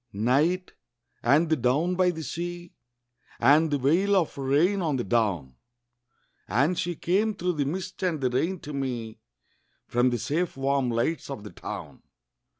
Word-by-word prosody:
NIGHT, 145 - +1 0.5
and 145 +8 +4
the 160 - +3
down 145 +7 +1
by 180 0 +3
the 160 -2 -4
sea, 175 +3 -5 0.7
And 150 +6 +5
the 145 - +1
veil 170 +10 +2
of 175 -5 +1
rain 150 +9 +2
on 155 -5 0
the 125 - -1
down; 95 - 0 0.9
And 140 - +1
she 175 0 -2
came 205 +7 +1
through 180 -1 -1
the 145 -3 -1
mist 185 +5 -4
and 175 -5 0
the 130 -2 0
rain 170 +9 0
to 150 - -7
me 120 -5 -4 0.7
From 120 +1 +2
the 120 - -1
safe 150 - -2
warm 135 -1 +1
lights 120 +9 -1
of 135 -7 -6
the 105 - -9
town. - - -8
145 Hz, 160 wpm, -26 LUFS, 125-175 Hz, 0.9 s, And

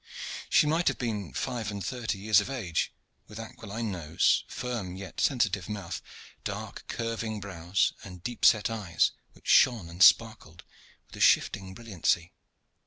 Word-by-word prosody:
She - - +5
might 160 +3 +1
have - - +2
been 105 - -3
five 120 - -3
and 100 -2 -5
thirty 120 -5 -2
years 105 +1 +4
of 105 - -6
age, 105 -12 -2 0.4
with 105 - -11
aquiline 110 -1 -5
nose, 80 -5 +2
firm 115 -8 -4
yet 95 0 -6
sensitive 105 -8 +1
mouth, 100 -5 -5 0.4
dark - - -6
curving 115 -2 -3
brows, 90 -2 0
and 90 -3 -10
deep 120 -1 -5
set 105 -3 +6
eyes 100 -8 +1 0.2
which - - -18
shone 110 -9 +5
and 85 +2 -8
sparkled 110 -7 +4 0.4
with - - -13
a - - -5
shifting 95 -2 +3
brilliancy. 95 -6 -1
105 Hz, 150 wpm, -29 LUFS, 90-115 Hz, 0.4 s, set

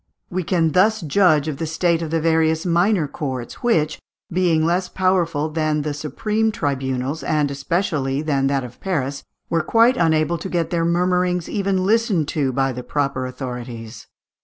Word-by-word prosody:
We 185 +1 -1
can 165 -1 +1
thus 215 +6 +3
judge 155 -2 +3
of 150 -3 -3
the 160 +1 -3
state 165 +1 +1
of 165 - -3
the 165 +1 0
various 160 0 +2
minor 175 -1 +2
courts, 130 -5 -5
which, 165 -11 +1 0.3
being 170 -3 +2
less 180 +2 0
powerful 175 -5 +1
than 155 -1 0
the 150 0 -2
supreme 210 - -1
tribunals, 135 -2 -2
and 150 -2 +1
especially 140 -2 -1
than 140 -3 +1
that 135 -1 0
of 125 -1 -10
Paris, 140 -7 -2 0.3
were 165 - +1
quite 230 +8 +4
unable 165 0 +2
to 190 - -5
get 170 -3 -1
their 170 -1 +1
murmurings 180 0 +1
even 195 -2 0
listened 210 - +2
to 140 -4 0
by 135 +1 0
the 125 - -5
proper 135 0 -2
authorities. 125 -3 -7
160 Hz, 165 wpm, -21 LUFS, 140-180 Hz, 0.3 s, quite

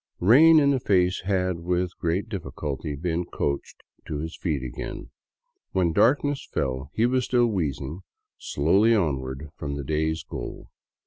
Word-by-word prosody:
" - - -47
Rain 160 +4 +8
in 140 -1 +4
the 135 - +1
Face 90 -5 +2
" - - -21
had 90 -2 0
with 90 +1 -1
great 85 +6 -1
difficulty 75 - -4
been 85 +3 -1
coaxed 70 -4 -4 0.2
to 75 - -3
his 80 +2 -5
feet 75 -7 -2
again. 60 0 -6 0.6
When 90 -3 +2
darkness 140 - +2
fell, 65 0 -2
he 110 - +3
was 125 0 +1
still 120 -1 +3
wheezing 80 - -2 0.4
slowly 100 +10 +3
on 80 -10 +1
ward 65 +1 -6
far 75 - -9
from 70 -1 -4
the 70 - -4
day's 80 +2 -1
goal. - - -7
85 Hz, 170 wpm, -25 LUFS, 75-105 Hz, 0.6 s, Rain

